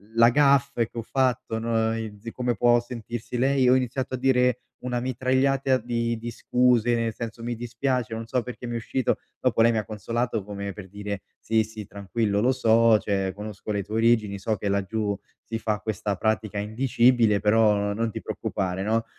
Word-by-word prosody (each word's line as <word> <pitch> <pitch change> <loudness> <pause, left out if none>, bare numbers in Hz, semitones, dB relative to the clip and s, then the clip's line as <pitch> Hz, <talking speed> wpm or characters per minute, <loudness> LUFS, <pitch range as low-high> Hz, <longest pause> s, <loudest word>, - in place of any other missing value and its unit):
la 115 0 +7
gaffe 140 -3 +3
che - - -13
ho 115 - -2
fatto, 125 -3 0
no, 115 0 0
in 110 -2 -5
di 115 +2 -7
come 125 -1 -1
può 120 +3 +4
sentirsi 120 0 -6
lei, 135 +1 +2
e - - +5
ho 125 - +6
iniziato 130 +1 -1
a - - -4
dire 125 -1 +2 0.2
una 125 -1 -2
mitragliata 130 +2 +1
di 115 -1 -2
di 115 +1 -6
scuse 120 0 +2
nel 115 -1 -1
senso: 115 0 -7
"Mi 120 0 -2
dispiace, 120 0 -2
non 115 0 -5
so 125 +2 0
perché 125 +1 -8
mi 120 - -4
è - - -1
uscito." 120 +2 -1 0.2
Dopo - - +2
lei 115 +1 +6
mi 115 - 0
ha 105 - -1
consolato 115 +1 -2
come 100 0 -5
per 105 -2 -10
dire: 100 0 -5 0.2
"Sì, 110 -1 +1
sì, 110 -1 -8
tranquillo 100 +1 -1
lo 125 +4 +3
so, 115 -2 +4
cioè 95 -2 -1
conosco 105 0 -8
le 100 -1 -1
tue 105 +3 -6
origini, 110 -3 +2
so 110 +2 -1
che 100 0 -3
laggiù 100 +1 -1 0.3
si 115 0 -4
fa 110 -1 -1
questa 105 -1 -2
pratica 110 +1 -1
indicibile, 115 0 +3
però, 105 0 +4
no 100 0 -1
non 115 +2 -1
ti - - -6
preoccupare." 95 -1 -3
No, 110 +3 0
115 Hz, 200 wpm, -25 LUFS, 105-125 Hz, 0.3 s, la